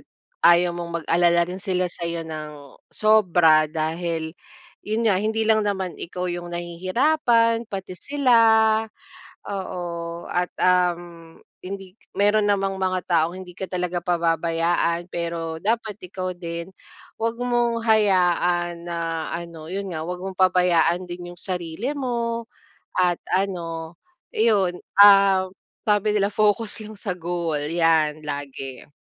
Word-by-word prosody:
at - - -23 0.4
ayaw 175 +1 +5
mong 170 -1 -4
mag-alala 170 0 +3
rin 185 - -5
sila 185 -2 -1
sa'yo 170 -1 -4
ng, 155 -1 -6 0.4
sobra 175 -8 +4
dahil, 160 +1 -2 0.6
yun 220 +2 0
nga, 185 - +2
hindi 220 +1 0
lang 220 0 +4
naman 190 -3 -2
ikaw 180 +1 -5
yung 175 0 -5
nahihirapan, 230 - +1
pati 190 -3 -6
sila. 280 -4 +1 1.2
Oo, 190 -2 -4 0.5
at 180 0 0
uhm, 175 -2 0 0.2
hindi 190 0 -8 0.2
meron 205 +1 +3
namang 195 -1 0
mga 185 0 0
taong 165 +1 +2
hindi 180 - -12
ka 190 - -3
talaga 180 -1 -2
pababayaan, 170 0 0
pero 165 -1 -3
dapat 220 0 -1
ikaw 185 0 -5
din, 170 +1 -6 0.5
huwag 230 0 0
mong 240 -1 +1
hayaan 175 -5 +2
na 170 - -3 0.4
ano, 170 -2 -9
yun 195 +2 -4
nga, 155 - -4
huwag 180 +1 -5
mong 190 -1 -6
pabayaan 180 -1 +3
din 175 0 -7
yung 175 - -7
sarili 180 - -3
mo, 235 -3 -2 0.5
at 180 -2 +3 0.2
ano 170 -4 -2 0.4
iyon, 200 -5 +2 0.2
uhm, 195 -2 +6 0.3
sabi 210 0 +1
nila, 200 0 +2
"Focus 210 +2 +1
lang 215 0 -9
sa 205 - -4
goal" 170 -3 -2
'yan 155 0 +1
lagi. 140 -3 -6
180 Hz, 130 wpm, -23 LUFS, 170-205 Hz, 1.2 s, uhm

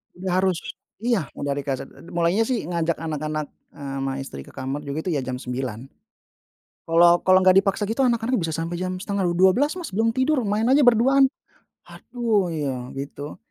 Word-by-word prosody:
Udah 185 +1 -4
harus. 185 -2 +1 0.4
Iya, 225 - 0
udah 145 - -2
di 145 - -3
kaset. 135 -2 -2
Eee, 140 - -16
d - - -11
mulainya 175 +5 +2
sih 245 - -1
ngajak 170 -1 -1
anak-anak, 155 -1 -3 0.3
eee, 140 -1 -6
ama 135 0 -2
istri 135 - -7
ke - - -13
kamar 135 +2 -4
juga 145 +3 -4
itu 185 - 0
ya 145 - 0
jam 130 0 -4
9.00. 125 -2 -5 1.0
Kalau 170 +1 +5
kalau 185 0 +6
nggak 185 0 +5
dipaksa 195 +1 0
gitu 230 +5 +1
anak-anak 240 0 +1
bisa 165 -3 -2
sampai 165 +2 -3
jam 185 0 -3
setengah 200 -1 -2
d 175 - +1
dua 185 +2 +5
belas 290 +4 +2
Mas 345 - -5
belum 225 +2 +2
tidur, 260 +3 +1
main 210 +2 0
aja 275 +3 +5
berduaan. 250 +3 +5 0.6
"Aduh," 225 -6 -1
ya, 145 -4 -2 0.2
gitu. 145 +1 -6
175 Hz, 195 wpm, -23 LUFS, 145-225 Hz, 1.0 s, kalau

